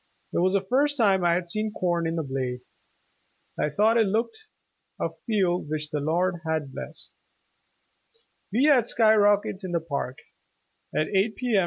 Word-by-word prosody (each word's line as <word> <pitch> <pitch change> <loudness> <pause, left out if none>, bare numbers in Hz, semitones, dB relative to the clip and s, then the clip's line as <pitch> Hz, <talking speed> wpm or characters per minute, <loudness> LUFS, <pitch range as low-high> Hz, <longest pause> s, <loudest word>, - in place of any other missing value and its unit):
It - - +1
was 185 +2 +2
the 200 - +2
first 285 +5 +2
time 195 -6 +3
I 170 -1 +3
had 175 0 -2
seen 215 +4 -2
corn 175 -4 -1
in 165 - -2
the 165 - -1
blade. 130 -2 -3 1.0
I - - +1
thought 215 +9 +3
it 225 -3 +3
looked 245 - -2 0.5
a - - -1 0.2
field 185 -7 0
which 155 0 -3
the 150 - -1
Lord 170 +4 0
had 155 -4 -2
blessed. - - -9 1.4
We 235 +7 +2
had 265 -6 +4
sky 220 -2 +4
rockets 205 -1 +2
in 185 -2 -5
the 170 - +2
Park 140 -5 -4 0.8
at 155 - +1
eight 205 +2 +1
P. 245 -3 -1
M. - - +5
185 Hz, 175 wpm, -26 LUFS, 160-220 Hz, 1.4 s, M